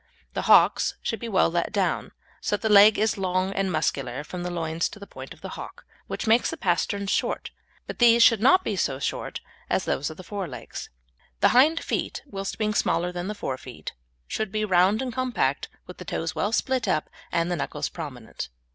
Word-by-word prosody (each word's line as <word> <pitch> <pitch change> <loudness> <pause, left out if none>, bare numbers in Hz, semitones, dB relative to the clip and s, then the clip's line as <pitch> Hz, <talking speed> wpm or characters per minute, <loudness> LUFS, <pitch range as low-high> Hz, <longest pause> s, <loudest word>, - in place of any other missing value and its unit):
The - - -1
hocks - - +5
should 225 - -2
be 235 - -5
well 190 -5 +3
let 170 0 -1
down, 200 -3 0 0.3
so - - 0
that 225 - -2
the 215 - +3
leg 205 +1 +8
is 215 -1 +1
long 185 0 0
and 195 -1 0
muscular 140 -4 -1
from 175 +3 -7
the 180 - -3
loins 165 -1 -1
to - - -11
the 200 - -9
point - - -10
of - - -12
the - - -6
hock, - - -9 0.2
which - - -4
makes 230 +2 +4
the 330 - -5
pasterns 200 - 0
short, - - -1 0.3
but - - -7
these 235 -1 +7
should 230 -3 +6
not 370 +10 +5
be 210 - -1
so 140 -7 0
short 135 - -3 0.3
as - - +1
those 145 - -1
of 155 - -9
the 185 - -9
fore 195 0 -4
legs. 125 -5 -8 0.5
The - - +6
hind 305 +6 +5
feet, - - -3
whilst 195 -7 -5
being 215 -1 0
smaller 175 -3 +1
than 175 +1 -4
the 210 - -3
forefeet, 130 -9 -6 0.3
should 220 -2 -3
be 215 +1 0
round 190 +4 +3
and 250 -2 -4
compact, 250 - 0 0.2
with 180 - -11
the 180 - -8
toes 165 0 -3
well 205 - -1
split 260 +2 0
up, 155 - +1 0.2
and 170 0 0
the - - +1
knuckles 155 - -3
prominent. - - -7
195 Hz, 210 wpm, -25 LUFS, 170-220 Hz, 0.5 s, leg